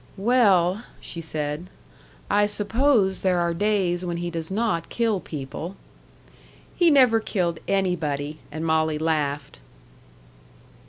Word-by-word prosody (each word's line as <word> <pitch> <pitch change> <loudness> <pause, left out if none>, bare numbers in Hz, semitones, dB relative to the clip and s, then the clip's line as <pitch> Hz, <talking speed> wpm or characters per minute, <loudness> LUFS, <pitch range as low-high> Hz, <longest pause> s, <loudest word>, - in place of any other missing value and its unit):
"Well," 200 -3 +3 0.2
she 170 - -6
said, 155 +1 -4 0.6
"I 205 0 +3
suppose 210 -1 +1
there 185 -2 +2
are 170 -1 +1
days 185 -2 0
when 175 -1 -3
he 175 0 -3
does 165 -1 -4
not 195 -5 -1
kill 225 -4 0
people." 155 +4 -6 1.0
"He 345 -2 +4
never 255 -6 +5
killed 175 -6 -1
anybody!" 155 -6 -1
And 160 +2 -4
Molly 160 -1 +1
laughed. 150 - -2
175 Hz, 115 wpm, -24 LUFS, 160-205 Hz, 1.0 s, never